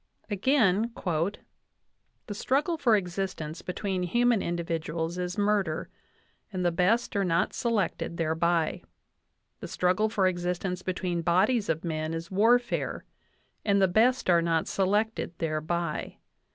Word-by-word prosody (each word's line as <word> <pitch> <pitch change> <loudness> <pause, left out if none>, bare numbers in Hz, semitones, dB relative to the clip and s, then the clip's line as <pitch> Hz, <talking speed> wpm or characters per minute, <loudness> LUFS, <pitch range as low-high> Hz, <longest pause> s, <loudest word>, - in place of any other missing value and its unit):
Again: 220 -1 +2 1.4
"The 210 - -5
struggle 280 - 0
for 250 -8 +3
existence 180 -4 -3
between 185 0 -3
human 240 +4 +2
individuals 165 0 -3
is 180 0 -3
murder, 200 -6 0 0.6
and 185 -2 -2
the 175 - +3
best 200 +9 +1
are 200 - +2
not 170 -1 +1
selected 220 -7 -1
thereby. 165 0 +1 0.8
The - - -6
struggle 185 +4 +1
for 200 -3 +1
existence 180 0 -1
between 180 -2 -2
bodies 200 +7 +2
of 160 0 -1
men 155 -1 -2
is 165 +2 -6
warfare, 235 +5 +2 0.6
and 200 -1 +3
the 190 - +5
best 235 +7 +3
are 170 -2 +5
not 165 -1 0
selected 205 -2 0
thereby. 160 +1 -2
180 Hz, 125 wpm, -28 LUFS, 170-210 Hz, 1.4 s, the